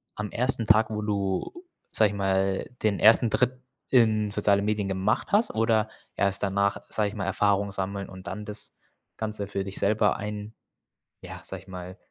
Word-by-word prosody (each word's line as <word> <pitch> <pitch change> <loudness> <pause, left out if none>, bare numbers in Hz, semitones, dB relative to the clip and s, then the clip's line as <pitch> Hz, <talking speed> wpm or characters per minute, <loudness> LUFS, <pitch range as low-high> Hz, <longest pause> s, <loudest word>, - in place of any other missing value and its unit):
am 105 -1 -4
1. 125 -1 0
Tag, 110 +1 +4
wo 105 -1 -3
du, 100 - -2 0.3
sage 110 -2 +4
ich 100 - -6
mal, 95 -1 0
den 105 -3 +1
1. 115 +2 +6
Trip 125 +3 +1 0.3
in 110 -4 +3
soziale 100 -1 +2
Medien 105 -1 0
gemacht 95 - 0
hast? 215 +3 +3
Oder 110 -1 +2 0.3
erst 100 -1 +1
danach, 100 0 +1
sage 105 -2 +1
ich 105 - -10
mal, 100 - -3
Erfahrung 100 0 +1
sammeln 100 0 -3
und 95 0 -11
dann 105 +2 -5
das 105 +1 -6 0.4
Ganze 105 -2 -3
für 100 0 -3
dich 95 0 -4
selber 105 +2 +2
ein 105 +1 -6 0.7
ja, - - -8
sage 95 -1 -7
ich 95 - -22
mal, 90 0 -8
105 Hz, 180 wpm, -27 LUFS, 100-110 Hz, 0.7 s, 1